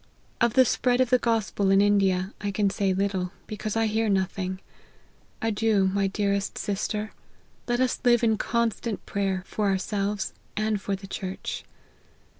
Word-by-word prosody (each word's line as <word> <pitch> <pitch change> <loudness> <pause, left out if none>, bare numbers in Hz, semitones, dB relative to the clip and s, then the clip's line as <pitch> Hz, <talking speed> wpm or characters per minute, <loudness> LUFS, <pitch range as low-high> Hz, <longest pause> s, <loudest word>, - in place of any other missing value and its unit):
Of 235 -2 +3
the 260 - +7
spread 250 0 +2
of 255 -1 +2
the 250 - +5
gospel 220 -4 +1
in 195 0 +5
India, 195 -2 +3
I 205 - -1
can 200 0 +1
say 195 -1 +1
little, 190 -1 -1
because 215 0 -4
I 225 - +3
hear 220 0 +1
nothing. 190 -1 -1 0.8
Adieu, 215 -3 +2
my 200 0 +2
dearest 200 0 -1
sister: 210 +1 -2 0.6
let 240 0 +1
us 255 -1 +1
live 240 -1 +4
in 220 -1 +4
constant 235 -1 -1
prayer, 195 -2 -1
for 210 0 -1
ourselves, 200 +1 -1 0.2
and 215 -1 0
for 200 - -1
the 195 +1 -10
church." 190 -1 -5
205 Hz, 155 wpm, -26 LUFS, 195-225 Hz, 0.8 s, the